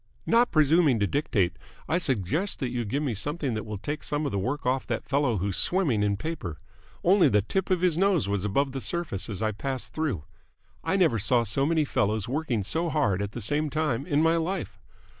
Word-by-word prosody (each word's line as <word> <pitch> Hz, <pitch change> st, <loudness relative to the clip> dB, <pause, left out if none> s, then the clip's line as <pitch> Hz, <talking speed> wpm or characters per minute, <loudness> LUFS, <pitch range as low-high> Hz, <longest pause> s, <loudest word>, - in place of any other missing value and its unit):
"Not 235 Hz, +1 st, +4 dB
presuming 155 Hz, -4 st, +4 dB
to 100 Hz, -, +2 dB
dictate, 100 Hz, -, 0 dB, 0.3 s
I 165 Hz, +3 st, +1 dB
suggest 140 Hz, -, -1 dB
that 130 Hz, -, -2 dB
you 120 Hz, -2 st, -2 dB
give 140 Hz, +8 st, -1 dB
me 135 Hz, -5 st, -1 dB
something 145 Hz, -, -1 dB
that 110 Hz, 0 st, -4 dB
will 105 Hz, -1 st, -4 dB
take 145 Hz, +9 st, -5 dB
some 150 Hz, +1 st, -1 dB
of 140 Hz, -, -1 dB
the 100 Hz, -, -1 dB
work 130 Hz, +9 st, -3 dB
off 130 Hz, +1 st, 0 dB
that -, -, -3 dB
fellow 140 Hz, -5 st, +1 dB
who's 95 Hz, +1 st, -1 dB
swimming 165 Hz, -, +2 dB
in 100 Hz, -1 st, +1 dB
paper. 145 Hz, -, -5 dB, 0.5 s
Only 185 Hz, +1 st, +5 dB
the 105 Hz, -1 st, +3 dB
tip 190 Hz, -, -2 dB
of 185 Hz, -2 st, +1 dB
his 175 Hz, -3 st, +2 dB
nose 190 Hz, -, +2 dB
was 100 Hz, -2 st, -1 dB
above 135 Hz, +7 st, 0 dB
the 135 Hz, 0 st, -5 dB
surface 170 Hz, -, -2 dB
as 105 Hz, 0 st, -4 dB
I 110 Hz, -, +1 dB
passed 120 Hz, 0 st, -4 dB
through. 140 Hz, -, -2 dB, 0.6 s
I -, -, 0 dB
never 165 Hz, -, +3 dB
saw 120 Hz, +4 st, +3 dB
so 135 Hz, +6 st, 0 dB
many 160 Hz, -2 st, +2 dB
fellows 105 Hz, -5 st, 0 dB
working 130 Hz, -5 st, -1 dB
so 165 Hz, -, 0 dB
hard 105 Hz, -12 st, +1 dB
at 100 Hz, 0 st, -4 dB
the 120 Hz, -, -5 dB
same 150 Hz, +8 st, +1 dB
time 150 Hz, -3 st, -1 dB
in 150 Hz, -2 st, +2 dB
my 165 Hz, +1 st, +3 dB
life. 180 Hz, +4 st, -3 dB
135 Hz, 215 wpm, -27 LUFS, 105-160 Hz, 0.6 s, Only